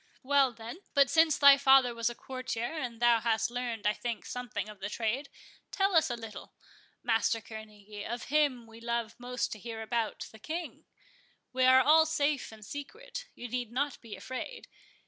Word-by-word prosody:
"Well, 275 -1 +4
then, 230 +7 -9 0.2
but 280 -3 +5
since 320 -2 +4
thy 280 -1 +8
father 265 -3 +6
was 230 0 0
a 240 - -7
courtier, 255 -1 -4
and 245 -6 -4
thou 240 -1 +5
hast 225 0 0
learned, 240 -4 -4
I 210 - +4
think, 235 0 -4
something 245 -5 -4
of 210 -2 -11
the 200 +1 -4
trade, 235 +6 -2 0.4
tell 390 -1 +1
us 320 - +5
a 240 - -1
little, 225 -2 -10 0.5
Master 225 -1 +2
Kerneguy, 215 -2 -10
of 240 0 -4
him 285 -6 +2
we 225 0 -14
love 235 -1 -2
most 245 0 -3
to 215 - -6
hear 225 +1 -6
about—the 220 -1 -3
King; 325 +8 -6 0.7
we 255 0 +3
are 260 0 +7
all 315 +4 +6
safe 295 -5 0
and 215 -1 -12
secret, - - -8
you 245 - -7
need 245 -1 -3
not 275 +2 -2
be 230 -3 -8
afraid. 260 - -7
240 Hz, 180 wpm, -30 LUFS, 225-280 Hz, 0.7 s, thy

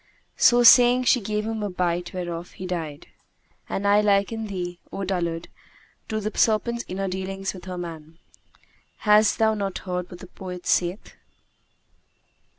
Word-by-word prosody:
So 240 0 +5
saying, 245 +1 +7
she 245 0 +3
gave 210 +1 -2
him 220 -1 -3
a 205 - -2
bite 175 -1 -2
whereof 175 -1 -5
he 185 - -8
died. 165 -5 -5 0.6
And 200 - -3
I 205 +1 +5
liken 210 +2 +1
thee, 175 -3 -5
O 195 - -4
dullard, 175 -3 -2 0.6
to 215 - -1
the 215 +1 -4
serpent 235 +2 +1
in 185 - -6
her 195 0 -1
dealings 190 +1 -4
with 185 - -10
that 185 -1 -6
man. 165 -2 -8 0.9
Hast 210 0 +5
thou 220 0 +3
not 200 -3 -3
heard 180 -1 -3
what 175 - -10
the - - -10
poet 180 -1 -9
saith? 180 +3 0
190 Hz, 155 wpm, -24 LUFS, 180-215 Hz, 0.9 s, saying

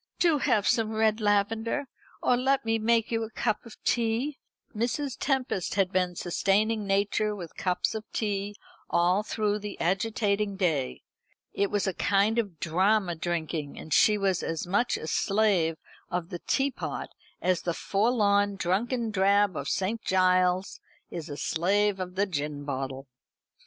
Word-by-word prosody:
"Do 330 -4 +3
have 210 -6 +2
some 225 -1 +2
red 220 0 +2
lavender. 220 +6 +1 0.4
Or 250 - +4
let 265 +1 +1
me 225 0 +1
make 230 +1 +2
you 225 -1 0
a 220 - -4
cup 220 +1 -2
of 225 - -13
tea." 240 +5 0 0.4
Mrs. 250 +5 -1
Tempest 265 - -1
had 195 -2 +2
been 180 -1 0
sustaining 205 +5 +1
nature 205 +2 +1
with 175 -5 -8
cups 180 -1 0
of 220 -1 -4
tea 205 -1 -2 0.3
all 175 +3 +3
through 210 -1 -1
the 205 -1 -7
agitating 200 +2 0
day. 160 -9 -1 0.5
It 200 0 +1
was 205 0 0
a 190 - 0
kind 205 +5 +2
of 195 -8 -3
drama 185 +3 +2
drinking, 160 -3 -3
and 155 - -5
she 210 +7 +5
was 195 -3 +1
as 165 -1 -3
much 205 +7 +1
a - - -7
slave 190 -3 +2 0.3
of 175 -1 -3
the 175 -3 -5
teapot 270 0 -1 0.3
as 185 -1 +1
the 170 -2 -2
forlorn 205 -2 +2
drunken 220 +6 -1
drab 200 -1 +3
of 140 -1 -3
St. 210 +4 -1
Giles's 185 0 +2 0.3
is 165 -3 -6
a 145 - -6
slave 195 +6 +1
of 180 0 -5
the 200 +2 +2
gin 150 -5 -3
bottle. 135 -1 -4
200 Hz, 155 wpm, -28 LUFS, 180-220 Hz, 0.5 s, she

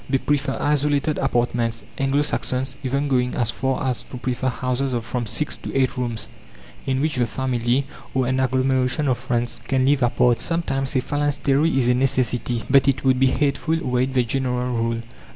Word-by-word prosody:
They 135 - +3
prefer 140 0 -1
isolated 145 0 +1
apartments, 120 -3 0
Anglo 135 +2 +1
Saxons 130 -2 -1
even 140 +2 0
going 125 -2 +1
as 115 -2 0
far 130 +4 -1
as 125 -2 -1
to 125 - -9
prefer 125 +1 -2
houses 130 +1 -1
of 120 -2 -2
from 120 -1 -3
six 150 +7 -2
to - - -7
eight 130 -2 +2
rooms, 120 -3 -3 0.6
in 130 0 +1
which 155 -2 0
the 120 -1 +2
family, 125 +2 0 0.3
or 130 -1 +2
an 130 +1 0
agglomeration 130 +2 +1
of 125 -2 +1
friends, 120 -2 -2
can 130 -1 +2
live 140 0 +3
apart. 120 0 +3
Sometimes 135 -6 -2
a 130 - +3
phalanstery 145 +2 +1
is 125 -3 +2
a 125 - +4
necessity, 125 -2 0
but 135 0 +4
it 135 -1 +1
would 130 -1 +3
be 135 - +5
hateful, 145 +4 +1
were 125 -7 0
it 130 +1 -1
the 125 - +4
general 125 0 -1
rule. 115 0 -1
130 Hz, 190 wpm, -22 LUFS, 125-135 Hz, 0.6 s, be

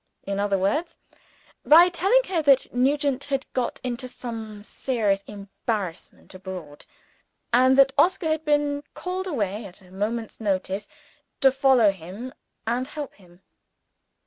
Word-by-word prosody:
In 200 0 -3
other 200 -1 +1
words, 210 - -1 0.7
by 335 +4 +8
telling 390 +8 +3
her 370 -8 -1
that 275 -3 +3
Nugent 275 +2 +1
had 275 -1 -2
got 250 -2 -2
into 250 0 -3
some 225 -4 -7
serious 210 -5 -1
embarrassment 200 -3 -5
abroad, 185 -6 -9 0.7
and 260 +2 +5
that 270 -1 +6
Oscar 355 -2 +3
had 315 0 0
been 290 -1 +1
called 370 +1 -4
away 215 - -2
at 190 0 -12
a 180 - -19
moment's 220 +4 -3
notice, 195 0 -1 0.5
to 270 -2 +6
follow 265 -5 +4
him 195 +8 -9 0.3
and 245 +3 -1
help 295 -1 -6
him. 180 -1 -21
245 Hz, 135 wpm, -25 LUFS, 200-285 Hz, 0.7 s, by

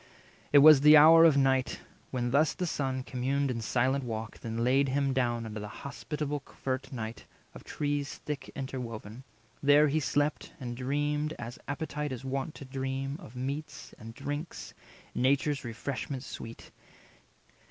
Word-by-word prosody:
It 145 - +7
was 155 -3 +9
the 150 +1 +9
hour 165 +2 +9
of 155 -4 +5
night, 135 -2 +2 0.3
when 120 -2 -2
thus 150 +4 +3
the 180 - -2
Son 135 -5 -2
260 - - -16
Communed 135 +2 0
in 115 -2 -3
silent 130 +4 +1
walk, 110 -2 -5
then 115 0 -3
laid 135 +3 +3
him 135 0 +1
down 120 -3 0
Under 110 -1 -6
the 105 - -6
hospitable 145 +4 -5
covert 130 -1 -5
nigh 115 -3 -4 0.4
Of - - -11
trees 145 -1 -2
thick 145 -3 -4
interwoven. 125 -3 -6 0.4
There 145 +1 +6
he 155 +3 +1
slept, 145 +1 -1
And 120 -3 -5
dreamed, 145 +4 -1
as 120 +1 -7
appetite 150 0 -3
is 130 0 -6
wont 135 +3 -3
to 140 - -9
dream, 135 +1 -3
Of 115 - -12
meats 140 +3 -5
and 115 0 -10
drinks, 145 +6 -5 0.4
nature's 140 +2 +1
refreshment 130 +3 -4
sweet. 115 -4 -9
135 Hz, 155 wpm, -30 LUFS, 125-145 Hz, 0.4 s, was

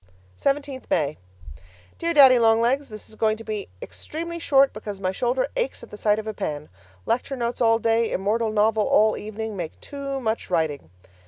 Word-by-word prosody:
17th 275 - -2
May 150 -1 0 0.8
Dear 335 0 0
Daddy 265 -4 +8
Long 225 -1 +4
Legs, 265 +5 +1
This 215 -1 -9
is - - -12
going 215 0 +1
to 225 - -10
be 215 -2 -4 0.2
extremely 335 +2 -6
short 275 -4 +4
because 205 -2 -7
my 185 -1 -1
shoulder 245 +6 0
aches - - -2
at - - -12
the - - -8
sight 210 0 +2
of 220 - -5
a 220 - -4
pen. 150 -7 -4 0.4
Lecture 250 +3 -1
notes 240 -1 -3
all 225 -1 +4
day, 225 0 +1
immortal 215 +4 0
novel 215 0 +2
all 215 0 +4
evening, 215 0 -5
make 170 -4 -6
too 275 -1 -5
much 225 -3 -2
writing. 160 - -1
225 Hz, 185 wpm, -24 LUFS, 210-265 Hz, 0.8 s, Daddy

